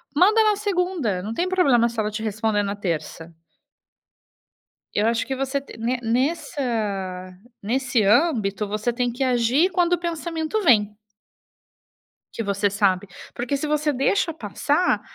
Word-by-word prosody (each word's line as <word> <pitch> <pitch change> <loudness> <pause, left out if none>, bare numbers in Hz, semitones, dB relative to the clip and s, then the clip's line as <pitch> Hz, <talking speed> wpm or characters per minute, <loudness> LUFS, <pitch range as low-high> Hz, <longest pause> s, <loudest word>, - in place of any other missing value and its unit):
Manda 420 +8 +5
na 425 -1 +3
segunda, 360 - -1
não 210 +4 -5
tem 350 +10 -1
problema 275 -11 +3
se 230 -1 -6
ela 210 -1 0
te 215 +1 -5
responder 215 -1 0
na 200 0 -3
terça. 170 -3 -4 1.6
Eu 210 - +2
acho 230 0 0
que 265 - -3
você 270 +1 -1
te 275 - -13
ne 240 +3 -1
nessa 275 +6 -1 1.0
nesse 240 +2 0
âmbito, 210 - +2
você 215 +4 -2
tem 245 0 -1
que 250 +3 -4
agir 255 +7 +2
quando 350 -1 +1
o - - -1
pensamento 335 +3 -2
vem. 210 - +3 1.4
Que - - -3
você 200 -1 0
sabe, 200 -1 +1 0.3
porque 250 +4 -2
se 280 - -3
você 300 0 +1
deixa 330 +6 +1
passar, 295 - 0
245 Hz, 145 wpm, -23 LUFS, 210-320 Hz, 1.6 s, Manda